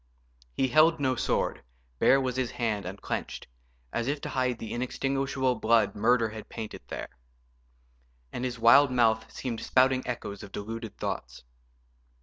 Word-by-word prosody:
He 130 - +1
held 155 +3 +5
no 130 -2 +1
sword, - - -1 0.4
bare 135 - +5
was 130 -2 -2
his 130 -2 -1
hand 110 -6 -2
and 95 +2 -7
clenched, - - -4 0.5
As 120 - -1
if 145 +1 -1
to - - -5
hide 125 -2 0
the 110 -2 -6
inextinguishable 135 +1 -1
blood 115 +1 +3
Murder 115 +2 +2
had 110 0 -9
painted 110 -2 -7
there. - - -6 1.2
And 125 - -4
his 125 -1 -2
wild 120 +5 +7
mouth 115 -2 +2
Seemed 120 -4 -4
spouting 130 0 +3
echoes 105 -5 -5
of 105 - -10
deluded 115 +2 -6
thoughts. - - -5
120 Hz, 150 wpm, -28 LUFS, 110-130 Hz, 1.2 s, wild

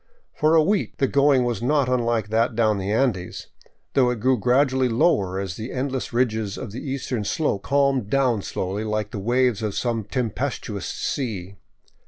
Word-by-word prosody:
For 155 +2 +3
a 160 - +6
week 200 +4 0
the 135 - +2
going 140 -1 +3
was 120 -2 -2
not 140 +2 +2
unlike 120 -4 0
that 115 +1 +1
down 110 -3 +2
the 95 +2 -2
Andes, 110 -6 -1 0.4
though 130 -3 +4
it 125 -2 -2
grew 130 +4 +3
gradually 130 +2 +2
lower 100 - +2
as 95 -2 -4
the 110 +3 -6
endless 130 0 -3
ridges 110 -4 0
of 120 -6 -6
the 120 - -6
eastern 130 -5 -3
slope 105 -2 -1
calmed 140 -5 +1
down 130 -5 +2
slowly, 95 +2 -3
like 105 -1 -2
the 105 - -5
waves 120 +1 +1
of 105 -3 -2
some 115 -4 -1
tempestuous 115 -1 -3
sea. 100 -8 -4
120 Hz, 175 wpm, -23 LUFS, 105-130 Hz, 0.4 s, a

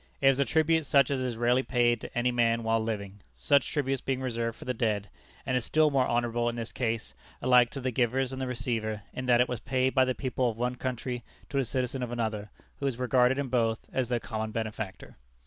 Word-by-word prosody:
It 135 - +5
was 135 0 +2
a 140 - +3
tribute 160 0 +2
such 140 -1 +4
as 135 - 0
is 125 -3 -2
rarely 120 +2 +3
paid 120 -3 +2
to - - -8
any 125 +1 +2
man 115 -1 +2
while 115 0 +2
living 100 -3 -4
such 140 -4 +2
tributes 135 -3 -1
being 135 -1 -1
reserved 115 -3 -2
for - - -11
the 125 - -1
dead 105 -4 -1 0.3
and 130 - 0
is 125 - +1
still 155 +4 +3
more 135 -2 +2
honorable 120 0 +1
in 120 - -4
this 115 -1 -5
case, 115 -2 -2 0.3
alike 125 -1 +5
to 140 - -6
the 130 -1 -1
givers 125 +2 0
and 130 - -5
the 130 - -2
receiver, 110 -4 -2
in 130 0 -5
that 120 -1 +5
it 125 - +3
was 125 - -3
paid 130 +1 0
by 130 - +5
the 130 -1 -1
people 130 -2 0
of 110 - -6
one 125 +1 0
country 125 -1 -4 0.3
to 140 - 0
a 135 - +1
citizen 130 +1 -2
of 125 -1 -3
another, 110 -3 -2 0.3
who 140 - -1
was 130 -4 -2
regarded 125 +1 +3
in 140 -2 -2
both 115 -3 0
as 130 -3 0
their 120 -1 +1
common 110 -1 -4
benefactor. 110 -3 -5
125 Hz, 235 wpm, -29 LUFS, 115-130 Hz, 0.3 s, It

